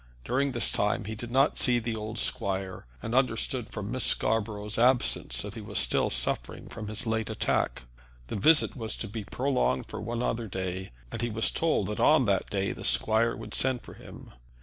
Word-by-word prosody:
During 135 +1 0
this 120 - +3
time 105 0 0
he 110 - -4
did 115 +2 -7
not 135 +4 +2
see 125 -2 +4
the 115 -1 -2
old 110 +1 -5
squire, 95 - -2 0.2
and 115 - -4
understood 125 -1 +1
from 105 +1 -5
Miss 130 -1 -1
Scarborough's 105 -1 0
absence 125 +1 +2
that - - -6
he - - -7
was - - -5
still - - +2
suffering - - -1
from 110 -2 -7
his 110 +4 -1
late 110 0 -1
attack. 105 - 0 0.4
The - - -5
visit 155 +10 +4
was 115 -4 -3
to 115 - -4
be 110 +1 -5
prolonged 125 - 0
for - - -6
one 120 +1 -3
other 115 -2 -1
day, 95 -1 -4 0.2
and 115 - -4
he 120 - -1
was 110 0 0
told 165 -1 +1
that 105 - -4
on 150 -4 +5
that 100 -3 +1
day 100 -1 -1
the - - -8
squire 110 +1 +2
would - - -8
send 130 -2 +2
for - - -11
him. - - -13
110 Hz, 200 wpm, -28 LUFS, 105-120 Hz, 0.4 s, on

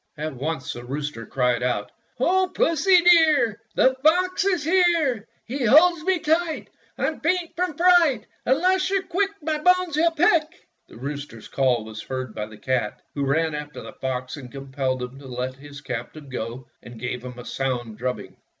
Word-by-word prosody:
At 155 0 -4
once 140 +1 -4
the 120 - -8
rooster 140 -2 -5
cried 125 -2 +1
out: 105 -5 -1 0.2
— - - -40
"O 370 +7 +2
Pussy, 345 +3 +4
dear, 305 - +5
The 260 - +4
fox 360 +5 +3
is 365 -6 +1
here! 325 - +2 0.2
He 265 +3 -3
holds 310 +8 +5
me 375 +1 +2
tight 320 0 -1
— - - -36
I'm 315 - -1
faint 345 +1 -1
from 350 -4 -2
fright! 335 -10 +4 0.2
Unless 370 +8 +2
you're 390 -1 +1
quick 385 +2 0
My 310 0 -1
bones 360 0 +3
he'll 330 +2 +4
pick!" 330 0 +1 0.2
The - - -14
rooster's 140 -3 -7
call 125 -5 +1
was 110 -1 -8
heard 130 -3 -5
by 105 -1 -4
the 110 0 -13
cat, 125 -4 -2
who 140 -1 -2
ran 160 +3 +1
after 150 0 -6
the - - -10
fox 130 +1 -4
and 125 -4 -10
compelled 135 -2 -3
him 125 +2 -8
to 140 - -12
let 125 +1 -4
his 140 0 -11
captive 130 +2 -7
go 120 +1 -5 0.2
and 120 -1 -12
gave 125 +1 -4
him 125 -1 -8
a 120 - -9
sound 120 -5 -3
drubbing. 125 +1 -4
155 Hz, 185 wpm, -24 LUFS, -, 0.2 s, dear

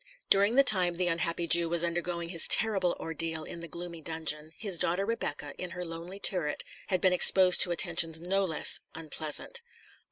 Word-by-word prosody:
During 200 +4 +3
the 275 - +5
time 180 -7 +2
the 180 +1 -2
unhappy 170 0 -3
Jew 170 0 +1
was 170 0 0
undergoing 170 0 -4
his 170 -2 +6
terrible 195 -6 +2
ordeal 165 0 -5
in 170 - -10
the 170 - -9
gloomy 170 0 -9
dungeon, 155 -1 -3
his 195 -6 -3
daughter 180 +4 -1
Rebecca, 150 -10 -5
in 180 - -6
her 180 - -6
lonely 170 +4 -10
turret, 175 -8 -2 0.2
had 185 -3 -2
been 185 -1 +2
exposed 180 0 +7
to 175 - +6
attentions 165 -2 +1
no 190 +3 -2
less 165 -5 +2 0.2
unpleasant. 160 - -3
170 Hz, 180 wpm, -28 LUFS, 165-185 Hz, 0.2 s, exposed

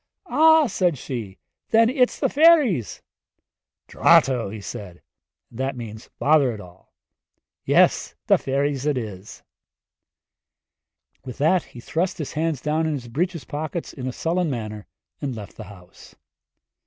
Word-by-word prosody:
'Ah,' 320 0 +5
said 180 - 0
she, 115 -7 -6 0.3
'then 225 0 +5
it's 250 0 +1
the - - +2
fairies!' 290 - +3 0.8
'Drato!' 115 -5 +3
said 100 -2 -8
he - - -23 0.5
and 120 - -12
that 135 0 -1
means 110 -2 -9
'Bother 145 -3 +3
it - - -10
all' 90 -2 -15 0.7
'yes - - +3
the - - +4
fairies 140 +1 -1
it 145 -3 +1
is.' 105 -4 -7 1.8
With 125 -3 -8
that 160 +5 +3
he 120 - -13
thrust 170 +9 -2
his 155 - -5
hands 155 -3 -1
down 155 +2 0
in 155 - -1
his 125 -4 -6
breeches 170 +4 -2
pockets 155 +5 -5
in 130 -2 -6
a - - -2
sullen 170 +5 -1
manner 110 -5 -5 0.3
and 135 -4 -3
left 105 -3 -9
the 110 - -9
house. 90 -3 -15
135 Hz, 140 wpm, -23 LUFS, 110-165 Hz, 1.8 s, Ah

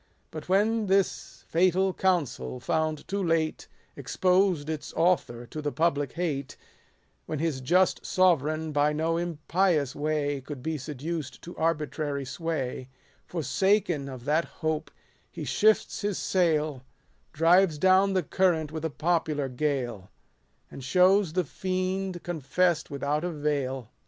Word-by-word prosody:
But 155 +2 -8
when 210 +3 +2
this 195 0 0
fatal 185 +2 +2
counsel, 170 -10 -1
found 155 +4 -1
too 200 0 -2
late, 165 -2 0 0.3
Exposed 180 -4 +1
its 155 -2 -4
author 150 -8 +1
to 155 +6 -7
the 145 -1 -2
public 145 -4 0
hate; 150 -6 -3 0.7
When 155 - -3
his 150 -3 -1
just 180 +8 +2
sovereign, 160 -3 +2
by 145 0 +2
no 160 +2 0
impious 170 -2 0
way 145 -2 -1
Could 135 -1 -8
be 160 -1 -2
seduced 150 0 -5
to 175 - -9
arbitrary 150 -3 -1
sway; 135 -3 -4 0.4
Forsaken 175 -1 +1
of 130 -2 -9
that 155 +3 +2 0.2
hope 155 -1 -1 0.4
he - - -7
shifts 215 +1 +2
his 205 -2 -1
sail, 155 -7 +1 0.5
Drives 165 +1 +4
down 190 +4 +4
the 185 -2 +1
current 160 -2 +1
with 160 0 -5
a 160 - 0
popular 155 -3 0
gale; 125 -5 -2
so 95 - -21 0.6
And 135 - -9
shows 180 +4 +4
the 185 0 +1
fiend 185 +2 -3
confess'd 175 +1 0
without 145 +2 -1
a 180 - -1
veil. 140 -6 -2
160 Hz, 135 wpm, -27 LUFS, 145-180 Hz, 0.7 s, Drives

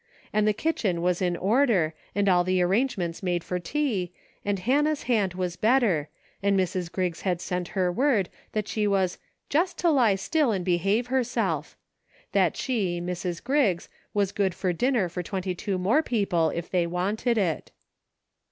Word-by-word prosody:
And 215 0 +2
the - - +5
kitchen 205 - -1
was 180 0 +1
in 175 -1 +1
order, 200 - +2 0.2
and 200 0 +1
all 180 -2 +4
arrangements 185 -1 +1
made 175 -3 -1
for 180 - -3
tea, 195 - -1 0.3
and 205 -1 0
Hannah's 290 +9 +1
hand 205 -7 +1
was 180 -2 -2
better, 215 - +2 0.3
and 200 0 +2
Mrs. 180 -1 -1
Griggs 180 -3 -2
had 180 -3 0
sent 180 -1 -3
her 180 -1 +2
word 235 -3 +2 0.3
that 215 -1 -1
she 210 -1 0
was 190 -3 +1 0.3
"jest 350 +5 +1
to 345 -2 +3
lie 240 -9 +4
still 290 - +1
and 190 -4 -2
behave 195 +6 +2
herself;" 225 - -1 0.5
that - - +2
she, 195 -9 -1
Mrs. 175 0 -4
Griggs, 250 - +1 0.2
was 200 -2 +1
good 195 -4 0
for 185 -2 -1
dinner 240 +1 +1
for 180 +1 -4
twenty 185 +1 -3
two 195 +1 -3
more 205 +12 +3
people 200 - +1
if 170 +2 -4
they 175 -2 +1
wanted 205 +7 0
it. 180 -7 0
195 Hz, 165 wpm, -26 LUFS, 180-230 Hz, 0.5 s, the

